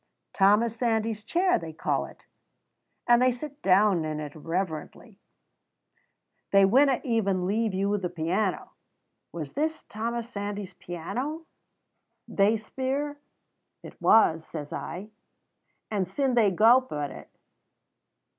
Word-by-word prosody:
'Thomas 210 +4 +3
Sandys's 225 -2 -1
chair,' 360 +10 +2
they 165 -1 -7
call 160 - -1
it, - - -17 0.8
and 240 0 +5
they 255 0 +4
sit 285 +4 -8
down 195 -2 +4
in 155 -1 -3
it 150 -1 -6
reverently. 170 +5 -5 1.3
They 195 -1 +6
winna 265 +6 +4
even 200 -7 0
leave 215 +1 0
you 200 +2 +1
the 180 -2 -3
piano. 180 +4 -2 0.6
'Was 155 -4 -6
this 315 +2 -2
Thomas 230 +2 -4
Sandys's 205 -3 -5
piano?' 250 - -5 0.8
they 210 +3 +2
speir. 270 +6 -3 0.6
'It - - -12
was,' 165 -7 +5
says 150 -3 -7
I, 195 +6 -6 0.8
and 195 -4 0
syne 265 +7 0
they 230 -4 +4
gowp 235 +7 +4
at 145 -1 -3
it." - - -11
210 Hz, 120 wpm, -27 LUFS, 180-240 Hz, 1.3 s, They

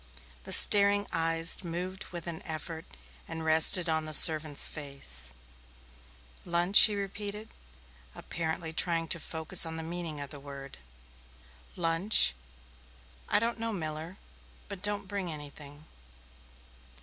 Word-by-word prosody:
The - - -7
staring 205 0 +6
eyes 165 +2 0
moved 180 +2 -6
with 175 -2 -10
an 165 -2 -6
effort 160 +1 -8 0.4
and 160 0 -7
rested 160 +3 +6
on 160 -1 -2
the 155 - -4
servant's 155 -3 +4
face. 135 - -7 1.1
"Lunch?" 175 +3 +2
he 210 - -2
repeated, 205 +2 -7 0.7
apparently 160 0 -6
trying 165 0 0
to 170 - +2
focus 160 0 0
on 160 -1 -5
the 160 - -6
meaning 165 -2 -6
of 140 -1 -8
the 145 - -10
word. 140 - -12 1.0
"Lunch? 165 - +1 1.0
I - - +2
don't 230 +2 -2
know, 230 0 -4
Miller. 160 0 -7 0.5
But 200 -3 -9
don't 205 -1 -2
bring 195 -3 -5
anything." 145 0 -10
165 Hz, 125 wpm, -28 LUFS, 155-185 Hz, 1.1 s, staring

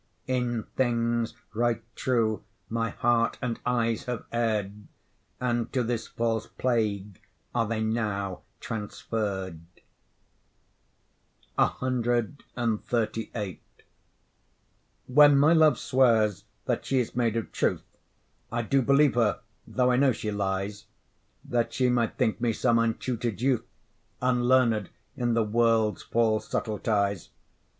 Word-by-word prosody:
In 125 -3 -1
things 120 -2 0 0.2
right 115 0 0
true 115 -4 0 0.3
my 115 0 -1
heart 115 +2 +1
and 120 -3 -3
eyes 115 -2 0
have 125 -2 -4
err'd, 105 -3 -1 0.5
And 120 -2 -1
to 130 -2 +1
this 115 -1 -2
false 115 -2 -1
plague 105 -6 -1 0.3
are 115 - +1
they 110 0 -2
now 105 -5 -2 0.2
transferr'd. 105 -5 -4 1.9
CXXXVIII 120 -4 -1 1.5
When 145 +2 +6
my 150 +4 +5
love 155 -5 +5
swears 115 -6 +2 0.2
that - - -1
she 135 - 0
is 125 -3 -1
made 115 -2 +1
of 115 - -4
truth, - - 0 0.7
I 120 +1 -1
do 135 +4 +2
believe 140 +2 +4
her 115 -4 +1 0.3
though 125 -1 +2
I 125 - +3
know 135 -1 +4
she 105 -1 -4
lies, 100 0 -2 0.6
That 120 -1 0
she 125 -1 +2
might 120 -2 0
think 115 -4 0
me 120 -2 +2
some 115 +1 +2
untutor'd 115 0 -1
youth, 130 -1 +1 0.5
Unlearned 125 -4 +2 0.3
in 120 -3 0
the 115 - +3
world's 110 0 +2
false 110 -2 +1
subtleties. 100 -3 -1
115 Hz, 115 wpm, -27 LUFS, 110-125 Hz, 1.9 s, When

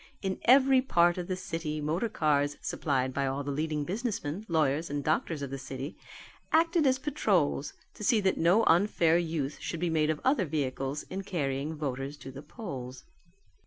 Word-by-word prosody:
In 190 -1 -2
every 265 +1 +6
part 175 -8 +3
of 175 - -4
the 185 - -1
city 165 -4 -4
motor 160 +9 -1
cars, 145 -6 +1
supplied 130 -3 -1
by 140 0 0
all 135 +2 -2
the 140 - -3
leading 150 +1 -1
businessmen, 200 - -3
lawyers, 155 -1 +1
and 145 0 -3
doctors 155 0 0
of 135 - -5
the 135 - -4
city, 135 +2 -6 0.6
acted 330 -1 +3
as 260 0 +3
patrols 200 - 0 0.2
to - - -9
see 220 +2 +4
that 190 -1 +2
no 180 +7 +4
unfair 170 -2 +4
use 160 -4 -3
should 170 - -4
be 175 0 0
made 155 -1 +2
of 155 -1 0
other 260 -7 +3
vehicles 140 -2 -2
in 190 - -3
carrying 150 -5 -2
voters 140 -1 -4
to 135 - -9
the 135 +1 -9
polls. 130 - -8
160 Hz, 180 wpm, -29 LUFS, 140-190 Hz, 0.6 s, every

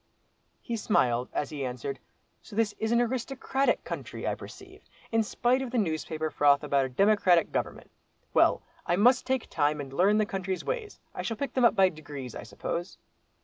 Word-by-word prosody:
He 235 - -3
smiled, 125 - +1
as 145 - -2
he 145 -3 -4
answered, 130 +1 -4 0.4
"So - - -12
this 220 -2 +1
is 220 +1 -1
an 235 - +4
aristocratic 260 +3 0
country, - - -5
I - - +1
perceive, - - -11 0.3
in 225 0 +3
spite 245 +4 +1
of 265 - -3
the 250 - -2
newspaper 155 -4 -1
froth 145 0 +4
about 140 -2 +2
a - - -4
democratic 185 +2 +3
government. - - -3 0.4
Well, - - +4 0.2
I 175 - +3
must 245 +7 +4
take 260 -2 0
time, 150 -1 0
and 135 -2 -6
learn 195 +7 +4
the 215 - +3
country's 190 -2 -3
ways. 465 -4 -4
I - - -4
shall 225 - -3
pick 280 +4 -3
them 255 -2 +3
up 235 - +5
by 190 -2 +5
degrees, 145 -6 -8
I - - -6
suppose." 175 +3 -5
190 Hz, 190 wpm, -28 LUFS, 145-235 Hz, 0.4 s, up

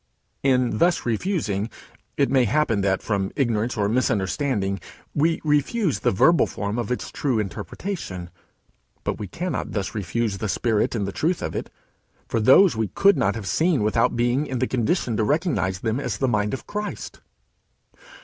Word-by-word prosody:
In 125 -5 +2
thus 175 +4 +2
refusing, 115 - -1 0.5
it 140 - +2
may 130 -2 +4
happen 120 -4 +1
that, 95 -1 +1
from 100 -3 -1
ignorance 115 -3 0
or 100 -1 +2
misunderstanding, 105 -2 0 0.3
we 160 +3 +2
refuse 150 - +1
the - - +2
verbal 165 - +4
form 105 +3 -3
of 120 -1 -3
its 125 - -3
true 135 -5 0
interpretation, 100 - -5 0.7
but - - -2
we 105 - -4
cannot 180 - -4
thus 100 -3 -2
refuse 105 +1 -2
the 105 - -2
spirit 110 +4 +1
and 100 -3 -1
the - - -3
truth 165 - -1
of - - -3
it, - - -4 0.6
for - - 0
those 135 - +6
we 110 -1 0
could 200 - +4
not 95 +1 +1
have 110 -3 -5
seen 160 - +2
without 110 +2 +2
being 120 +5 +1
in 130 - -3
the 130 - +1
condition 125 - 0
to 110 - +2
recognize 140 - 0
them 115 +2 -1
as 125 -8 -3
the 130 - +1
mind 105 -1 +1
of - - -10
Christ. 210 0 -5
120 Hz, 170 wpm, -24 LUFS, 105-145 Hz, 0.7 s, those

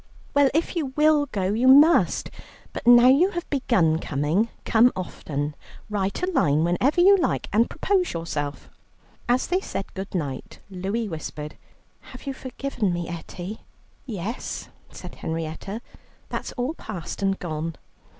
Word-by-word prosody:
"Well, 285 -1 +5
if 330 +3 0
you 320 -5 0
will 300 -1 +4
go, 195 -5 -1
you 240 +4 +2
must. 295 +6 +6 0.4
But - - -6
now 240 0 +8
you 285 +9 +5
have 345 - -3
begun 190 - +2
coming, 155 +10 0 0.2
come 235 +2 +5
often. 150 -5 -4 0.4
Write 200 - -1
a - - +4
line 150 - +3
whenever 210 - +2
you 395 +3 +8
like 360 - 0
and 225 +3 +3
propose 380 -3 0
yourself." 150 -4 -4 0.6
As 250 +1 +3
they 365 +2 0
said 195 - -5
good 195 0 -6
night, 140 -6 -4
Louie 195 +5 -2
whispered, 155 -3 -6 0.4
"Have 255 - -13
you 275 - -3
forgiven 260 -5 -3
me, 175 -1 -3
Etty?" 175 +4 -7 0.5
"Yes," 215 +1 -5 0.2
said - - -9
Henrietta, 165 +7 -5 0.5
"that's - - -4
all 250 +5 -2
past 200 - -7
and 195 0 +1
gone." 165 -1 -4
205 Hz, 145 wpm, -24 LUFS, 165-265 Hz, 0.6 s, now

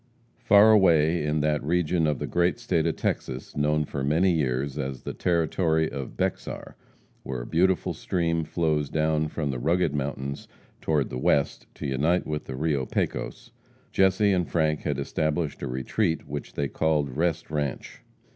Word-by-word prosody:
Far 105 +2 +6
away, 85 -6 +4
in 75 0 0
that 75 -1 0
region 85 +1 +1
of 75 -2 0
the - - -3
great 90 0 +1
state 85 -3 0
of - - 0
Texas - - -3
known 75 +1 +1
for 70 -1 -4
many 80 +7 +3
years 70 -3 -1
as 65 -2 -4
the - - -4
Territory 80 -1 +1
of 70 -2 -6
Bexar, - - -3 0.5
where 65 -2 -5
a - - -7
beautiful 90 +5 +1
stream 85 -2 -1
flows 75 -3 0
down 80 0 +1
from 75 -2 -3
the 65 - -4
rugged 80 +2 +1
mountains 70 -1 -4 0.3
toward 75 -4 0
the 65 - -3
west, 70 +2 +1
to - - -7
unite 75 +7 +1
with 75 -1 -4
the 65 - -6
Rio 70 -2 -1
Pecos, - - -3 0.4
Jesse 95 +2 +3
and 90 -2 0
Frank 80 -2 +1
had - - -2
established 75 -1 -2
a - - -3
retreat 75 - -1
which 70 0 -6
they 70 - -1
called 75 -4 0
Rest 80 -1 -1
Ranche. 75 -4 -3
75 Hz, 165 wpm, -26 LUFS, 70-85 Hz, 0.5 s, Far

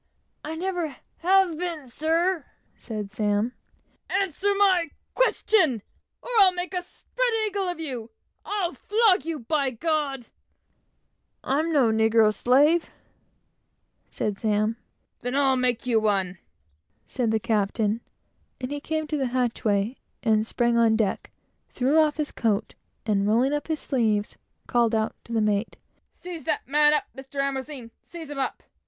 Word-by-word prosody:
"I 310 +2 -5
never 345 -4 -2 0.2
have 365 -2 +3
been, 335 -6 -4
sir," 325 +6 0 0.3
said 210 -3 -6
Sam. 210 +2 0 0.6
"Answer 390 +1 0
my 375 -5 +3 0.2
question, 365 - +2 0.4
or - - -9
I'll 385 -2 +8
make 360 +1 -5
a 360 - -1
spread - - -3 0.2
eagle 400 -2 -1
of 350 -2 -3
you! 250 -8 -4 0.3
I'll 390 -4 -2
flog 420 - +2
you, 325 -4 -3
by 275 +3 0
G 255 - -10
d." 295 -4 -1 1.2
"I'm 310 +5 0
no 265 -7 +4
negro 220 -1 +4
slave," 290 +9 +3 1.2
said 205 -2 -3
Sam. 215 0 +1 0.4
"Then 245 +2 -3
I'll 275 -2 +3
make 250 -2 0
you 235 -3 +3
one," 195 -4 0 0.7
said 245 -4 -1
the 220 0 +2
captain; 215 +1 0 0.6
and 255 +1 -5
he 290 - -3
came 315 +1 -2
to 300 0 -2
the 270 -2 0
hatchway, 235 -3 0 0.3
and 220 -2 +2
sprang 235 -1 +1
on 225 -1 +4
deck, 215 -4 -1 0.4
threw 270 +5 +2
off 305 -1 +3
his 300 -1 -2
coat, 220 -2 -1 0.3
and 205 -2 +1
rolling 245 +6 +3
up 295 - -2
his 315 -2 -1
sleeves, 215 -6 0 0.3
called 235 -2 +2
out 220 0 0
to - - -12
the 225 -1 +1
mate 210 +1 0 0.4
"Seize 345 -5 -8
that 310 - -1
man 295 +2 +5
up, 300 - +2
Mr. 270 +1 -12
A! 275 -2 -3 0.2
Seize 325 -4 -9
him 285 - -5
up! 265 - -2
270 Hz, 150 wpm, -25 LUFS, 225-325 Hz, 1.2 s, I'll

